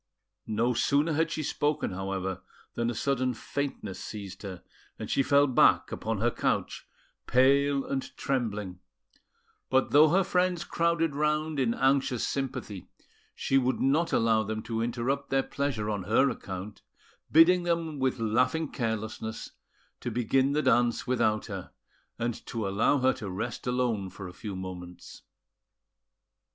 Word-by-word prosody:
No 115 +3 +1
sooner 145 +6 +2
had 160 +2 +1
she 155 -1 -3
spoken, 150 -2 -1
however, 95 0 -3 0.3
than 120 0 -1
a 120 - -3
sudden 130 -1 0
faintness 135 -6 -4
seized 100 -3 -7
her, 95 -4 -7 0.3
and - - -6
she - - +3
fell 140 +1 +4
back 130 -3 +4
upon 110 0 -2
her 120 +4 +1
couch, - - -2 0.4
pale 140 +2 +3
and 135 -1 -4
trembling; 105 -8 -2 0.9
but 130 0 +2
though 150 +2 +7
her 190 +4 +3
friends 180 -1 +1
crowded 165 -2 0
round 150 0 0
in 120 -3 +1
anxious 135 -2 +1
sympathy, 125 -8 -4 0.5
she 135 - +2
would 130 0 0
not 150 +6 +2
allow 115 -1 +3
them 110 0 -4
to 115 0 -3
interrupt 120 +4 -2
their 135 0 +2
pleasure 140 -7 -2
on 105 -4 -2
her 120 +6 +3
account, 95 +2 -7 0.5
bidding 170 +3 +6
them 165 -3 -1
with 130 -1 +1
laughing 125 +8 +1
carelessness 110 -1 -4 0.5
to - - -4
begin 130 +3 +1
the 150 +1 +1
dance 120 -1 +2
without 110 -4 +1
her, 95 -4 -7 0.4
and 120 -1 -3
to 110 -4 -3
allow 100 +8 +2
her 130 0 +3
to 100 - -7
rest 115 +8 -4
alone 120 -6 0
for 95 0 -9
a 90 - -10
few 100 0 -6
moments. 90 -1 -8
125 Hz, 145 wpm, -28 LUFS, 110-140 Hz, 0.9 s, though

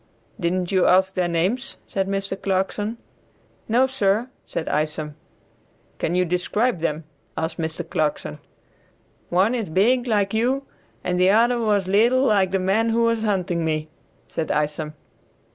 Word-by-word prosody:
"Didn't 180 0 -1
you 185 -2 +3
ask 190 +1 +4
their 180 -2 0
names?" 190 +11 -1
said 195 -1 -2
Mr. 195 0 -2
Clarkson. 200 +3 -1 0.7
"No, 240 +4 +4
sir," 235 -2 0 0.2
said 160 - -4
Isom. 150 0 -1 0.9
"Can 175 - -1
you 180 0 +3
describe 180 +5 0
them?" 160 -1 -2 0.3
asked 160 +2 -3
Mr. 160 +1 -3
Clarkson. 155 -2 -2 0.9
"One 190 +7 +3
is 225 -8 -2
big, 240 +9 +2
like 205 -3 +1
you, 255 +5 +1 0.4
and 180 0 -1
the 185 +1 +5
other 235 +4 +4
was 205 -4 +1
little 235 +7 +4
like 200 -7 +3
the 195 - +1
man 195 +5 +1
who 230 +1 +2
was 230 -1 +2
hunting 185 -5 0
me," 155 -1 -1 0.4
said 160 - -3
Isom. 150 +1 -1
190 Hz, 145 wpm, -23 LUFS, 170-225 Hz, 0.9 s, the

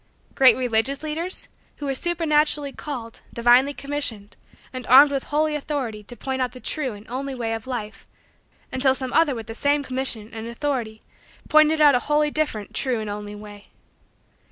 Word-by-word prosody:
Great 260 -1 +6
religious 255 +3 0
leaders 325 +4 -4 0.3
who 290 - -7
were 275 - -1
supernaturally 300 -2 +1
called, 245 -6 -7
divinely 245 +4 +4
commissioned, 275 -8 -4 0.4
and 255 -2 -7
armed 280 +3 +8
with 275 -1 -2
holy 305 +1 0
authority 275 -7 -3
to 210 +4 -10
point 265 -1 -3
out 250 - -1
the 255 - -10
true 265 -2 -2
and 205 +1 -13
only 265 +2 -4
way 230 -2 -2
of 225 +1 -6
life 230 -5 -6 0.6
until 260 0 +2
some 260 -1 -5
other 310 -5 +3
with 225 -1 -6
the 225 - -7
same 285 +4 +1
call, - - -12
commission, 255 -4 -3
and 225 0 -6
authority, 235 -3 -3 0.5
pointed 310 +1 +5
out 295 -2 +7
a 250 - +3
wholly 300 0 +2
different 290 -10 -2
true 255 -4 -1
and 215 -1 -4
only 205 0 -6
way? 205 -1 -12
260 Hz, 180 wpm, -23 LUFS, 225-290 Hz, 0.6 s, armed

